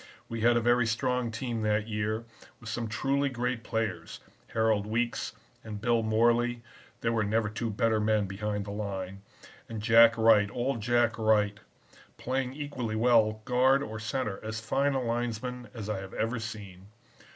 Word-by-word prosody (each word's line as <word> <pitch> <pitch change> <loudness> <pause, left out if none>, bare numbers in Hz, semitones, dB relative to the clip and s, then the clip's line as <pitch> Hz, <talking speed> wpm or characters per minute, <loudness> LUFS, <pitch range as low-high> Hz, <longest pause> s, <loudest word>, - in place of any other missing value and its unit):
We 115 -1 -4
had 120 +1 +4
a - - +2
very 120 0 +3
strong 125 +1 0
team 115 0 -3
that 105 0 +1
year, 110 +1 -2 0.3
with 115 - -9
some 115 +1 -3
truly 140 +5 0
great 125 -2 -2
players, 110 -9 -3 0.3
Harold 110 -2 +1
Weekes 120 +2 -1 0.3
and 105 -2 -6
Bill 115 +1 +2
Morley 120 +2 +2 0.4
(there 115 - +1
never 105 +1 +1
were - - -13
two 115 +1 -2
better 110 +1 +1
men 105 -1 +2
behind 105 +1 -3
the 100 - -6
line), 100 -2 -5 0.5
and 115 -1 -5
Jack 115 +1 +6
Wright, 110 -2 +5
old 125 -1 -2
Jack 120 0 +2
Wright, 105 -1 +2 0.6
playing 130 0 -2
equally 135 -6 -4
well 110 -2 +3
guard 130 +2 +3
or 110 -2 -6
center, 110 -2 -3
as 110 0 -4
fine 140 +5 0
a 130 - 0
linesman 120 +1 -3
as 110 -4 -7
I 105 -3 -2
have 95 0 -9
ever 115 +1 -1
seen. 100 -4 -8
115 Hz, 165 wpm, -29 LUFS, 105-120 Hz, 0.6 s, Jack